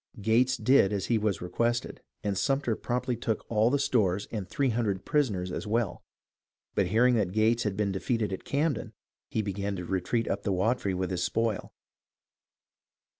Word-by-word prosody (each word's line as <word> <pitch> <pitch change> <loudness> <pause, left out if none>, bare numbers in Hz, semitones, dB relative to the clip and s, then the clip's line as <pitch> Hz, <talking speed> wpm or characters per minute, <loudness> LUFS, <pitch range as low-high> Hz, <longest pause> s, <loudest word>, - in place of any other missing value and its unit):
Gates 115 +5 +3
did 130 -7 +4
as 100 -2 -1
he 110 - +3
was 105 -4 -1
requested, 115 +7 -1 0.2
and 100 -1 -1
Sumter 135 +1 +1
promptly 125 +2 -2
took 115 -1 -2
all 110 +1 +4
the 140 - +2
stores 105 -9 +1
and 100 -5 -4
three 140 -2 +1
hundred 110 -5 -1
prisoners 100 -12 0
as 105 - -4
well; 110 -4 -1 0.7
but 100 - +1
hearing 120 +6 +4
that 105 -6 +1
Gates 110 +2 +3
had 105 -3 -2
been 105 -2 +1
de 95 - -2
feated 115 -4 -1
at 95 - -5
Camden, 140 -6 -1 0.4
he 110 - -1
began 100 0 -3
to 90 -1 -5
retreat 95 +6 -1
up - - -1
the 100 - -1
Wateree 100 0 0
with 95 0 -2
his 90 -1 -1
spoil. 110 +4 -1
110 Hz, 175 wpm, -29 LUFS, 95-120 Hz, 0.7 s, did